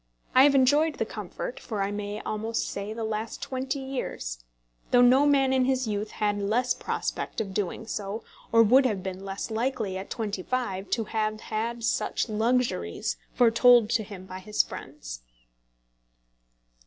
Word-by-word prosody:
I 260 +1 +8
have 285 -1 +4
enjoyed 290 +4 +4
the - - -1
comfort - - -6
for 210 -4 -3
I 195 - -1
may 205 0 -4
almost 220 +2 -2
say 200 +1 -4
the 225 +1 -4
last 220 +1 -3
twenty 260 +2 -3
years, 250 - -4 0.5
though 245 0 +6
no 260 +4 +6
man 270 -2 +4
in 260 -1 +3
his 260 -1 +1
youth 210 0 -2
had 205 -1 0
less 235 +5 +1
prospect - - -3
of 200 -4 -3
doing 205 +2 -2
so, 210 0 -4 0.3
or 230 0 +7
would 255 +5 +6
have 200 -6 -2
been 190 0 -5
less 195 +3 -5
likely 220 -4 -1
at 190 - -8
twenty 205 -4 -3
five 200 -4 -2
to 230 - +1
have 215 -1 -2
had 230 +2 -3
such 235 +1 0
luxuries 215 - 0 0.2
foretold 235 -1 +6
to 230 - +2
him 195 -3 -9
by 185 0 -7
his 210 +3 +1
friends. - - -8
220 Hz, 165 wpm, -27 LUFS, 200-250 Hz, 0.5 s, I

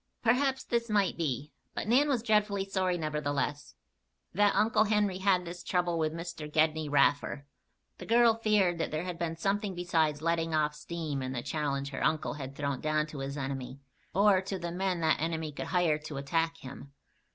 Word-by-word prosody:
Perhaps 265 +3 +2
this 235 -1 -1
might 205 -3 +2
be; 150 -2 -2 0.2
but - - -3
Nan 270 +6 +4
was 250 -5 +1
dreadfully 210 -3 +2
sorry, 185 -2 0
nevertheless, 150 -2 -2 0.6
that 205 +2 +3
Uncle 215 0 +3
Henry 205 -3 +1
had 190 -2 +2
this 175 +1 -7
trouble 175 -2 0
with 155 -1 +1
Mr. 165 -2 -6
Gedney 155 0 +2
Raffer. 140 0 +2 0.5
The - - -8
girl 235 0 +5
feared 210 -6 +2
that 165 - -1
there 155 +2 -2
had 180 -2 -5
been 165 -1 -2
something 195 +3 -1
besides 160 -4 0
"letting 165 -1 0
off 150 -1 +1
steam" 150 -2 -4
in 130 0 -3
the 120 -2 -3
challenge 140 -3 -2
her - - -4
uncle 155 - +1
had 140 -2 -7
thrown 140 -2 -2
down 155 0 +1
to 150 -2 -8
his 135 +1 -4
enemy, 135 -1 -4 0.3
or 200 -1 +4
to 195 0 -4
the 170 -1 -4
men 180 -1 -1
that 160 -1 +2
enemy 160 -1 -2
could 140 - -6
hire 170 -4 +2
to 150 -1 -7
attack 165 +4 0
him. 135 +1 -10
165 Hz, 185 wpm, -30 LUFS, 150-195 Hz, 0.6 s, girl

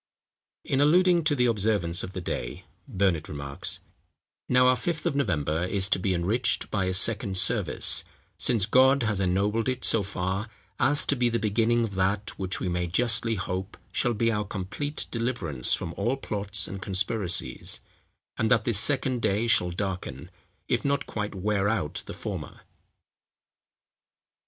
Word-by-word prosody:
In 135 - +1
alluding 175 +3 +4
to 150 -2 +2
the 125 -2 +2
observance 105 -6 +1
of 95 - -7
the 95 - -5
day, - - -5 0.2
Burnet 90 -5 0
remarks, 70 -1 -1 0.7
"Now 125 0 +5
our 125 0 +5
Fifth 155 +3 -3
of 170 -5 0
November 80 - 0
is 95 +1 0
to 95 - +2
be 95 0 0
enriched 105 +8 0
by 100 -3 0
a 95 - -1
second 100 -1 +3
service, - - +2 0.4
since 110 -5 +3
God 130 +4 +4
has 105 -3 0
ennobled 100 +6 +1
it 130 0 -2
so 115 - +4
far, 95 +2 -3 0.3
as 145 +1 +2
to 140 - +1
be 120 -2 +2
the 115 - 0
beginning 115 +2 +1
of 110 -3 -3
that 95 +2 0
which 95 -1 -1
we - - -3
may 90 0 -1
justly 115 +4 +1
hope 95 +1 -4
shall 120 -2 0
be 115 +2 +1
our 105 -1 -1
complete 105 +10 -4
deliverance 115 - -1
from 85 - -6
all 120 +9 -1
plots 100 -4 0
and 95 0 -7
conspiracies; 95 - 0 0.6
and 110 - +1
that 115 -4 +3
this 115 -4 +2
second 130 -1 +2
day 105 +3 +1
shall 90 -6 +3
darken, 90 +1 -5 0.4
if - - 0
not 140 0 0
quite 105 -1 -4
wear 100 +1 0
out 100 -9 -2
the - - -6
former." - - -7
105 Hz, 160 wpm, -26 LUFS, 95-120 Hz, 0.7 s, Now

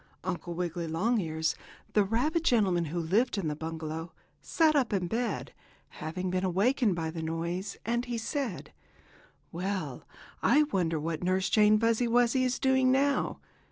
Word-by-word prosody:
Uncle 175 -1 -4
Wiggily 175 -1 -3
Longears, 160 -3 0 0.4
the 210 - +4
rabbit 255 - 0
gentleman 195 - +2
who 165 +3 -3
lived 205 +9 +1
in 190 -5 -1
the 150 - -3
bungalow, 160 +1 -5 0.3
sat 315 -2 +2
up 265 -5 +2
in 190 -3 +1
bed, 235 +7 -2 0.4
having 180 +4 -4
been 185 0 0
awakened 200 +3 +2
by 160 -1 -3
the 165 0 -5
noise, 170 +4 -3
and 240 +2 0
he 240 -1 -3
said: 230 - -4 0.8
"Well, 190 +3 -4 0.3
I 300 - +5
wonder 175 - 0
what 160 +1 -3
Nurse 185 +1 +1
Jane 215 0 +5
Fuzzy 230 +1 +2
Wuzzy 245 +2 +3
is 255 0 0
doing 265 -1 +3
now? 280 +2 +1
190 Hz, 155 wpm, -29 LUFS, 170-240 Hz, 0.8 s, I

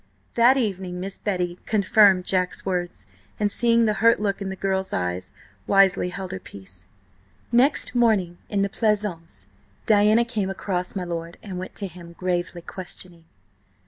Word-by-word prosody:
That 240 +3 +5
evening 190 -6 -2
Miss 195 +2 -4
Betty 180 -3 -2
confirmed 200 -3 +4
Jack's 185 -1 -1
words, 180 -2 -3 0.3
and 205 -1 +1
seeing 235 0 +3
the 215 - +2
hurt 230 +1 +5
look 200 -1 -1
in 195 - -3
the 190 - -4
girl's 190 0 -1
eyes, 90 0 -2 0.4
wisely 195 -2 +4
held 185 0 -6
her 185 - -5
peace. 95 - -11 0.6
Next 255 +4 +3
morning 210 -8 +2
in 200 -1 +1
the - - +1
pleasaunce 195 - -2 0.4
Diana 215 +2 +4
came 215 -5 -2
across 185 -1 -3
my 190 - -2
lord, 170 -1 -5
and 190 -3 -6
went 185 - -7
up - - -34
to 200 - -3
him, 170 -1 -12
gravely 175 -1 -2
questioning. 175 -2 -9
190 Hz, 160 wpm, -24 LUFS, 175-210 Hz, 0.6 s, That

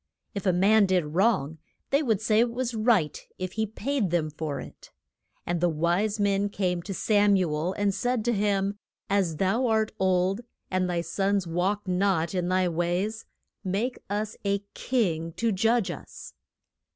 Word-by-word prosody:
If 200 -1 -3
a - - +5
man 200 +3 +4
did 185 -3 +2
wrong, 165 -6 +1 0.3
they 280 +2 +4
would 225 -9 +1
say 215 -1 +3
it 235 +1 +4
was 245 +1 -3
right 215 - +1
if 185 -1 -4
he 220 +2 -1
paid 220 0 -1
them 160 -2 0
for 150 -1 -4
it. - - -11 0.6
And 175 -1 -1
the 175 - +3
wise 175 +7 0
men 200 0 +2
came 180 -3 -1
to 195 +3 -6
Sam 205 0 +3
u 180 -5 +1
el, 160 +5 -1
and 205 0 0
said 240 +2 -1
to 240 - +2
him, 200 -1 0 0.3
As 190 -5 +2
thou 225 +8 +1
art 220 -1 +1
old, 190 +2 +2 0.3
and 185 -1 +1
thy 175 -1 0
sons 195 +3 0
walk 190 +5 -1
not 180 -2 +1
in 180 -2 -1
thy 185 0 +2
ways, 175 +6 -1 0.4
make 205 +7 -1
us 210 +2 -2
a 200 0 0
king 165 -10 -1
to 230 +4 0
judge 225 +2 +2
us. - - -10
195 Hz, 175 wpm, -27 LUFS, 175-215 Hz, 0.6 s, a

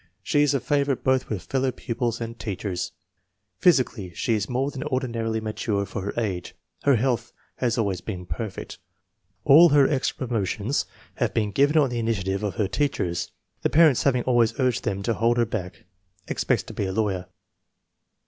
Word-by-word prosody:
She 145 - +2
is 145 -1 +3
a - - +2
favorite 140 0 0
both 130 -1 +1
with 100 -5 -3
fellow 135 0 0
pupils 120 -2 -3
and 115 0 -6
teachers. 95 -4 -3 0.7
Physically 125 - +2
she 115 - 0
is 105 -1 -1
more 130 +3 0
than 135 - -5
ordinarily 115 -4 -1
mature 105 -2 -2
for 100 - -5
her 100 - -4
age. 95 -6 -3 0.3
Her 140 -2 +4
health 120 -1 0 0.3
has 120 -2 0
always 100 -5 0
been 90 -4 -6
perfect. 105 +1 -6 0.7
All 160 +5 +8
her 140 -2 +5
extra 130 -2 -1
promo 115 -4 0
tions 110 +10 -1 0.3
have - - -1
been 105 -2 +1
given 145 +8 +3
on 140 -4 +4
the 120 - -2
initiative 100 -4 -1
of 105 -2 -2
her 105 -4 0
teachers, 95 - -1 0.3
the - - +1
parents 155 -4 +5
having 125 -3 +2
always 120 -2 +2
urged 125 -2 +1
them 100 0 -2
to 115 - +1
hold 115 +2 +2
her 120 - +3
back. 95 -5 -5 0.4
Expects - - 0
to - - -10
be - - -2
a - - -2
lawyer. 95 -3 -1
115 Hz, 180 wpm, -25 LUFS, 100-130 Hz, 0.7 s, All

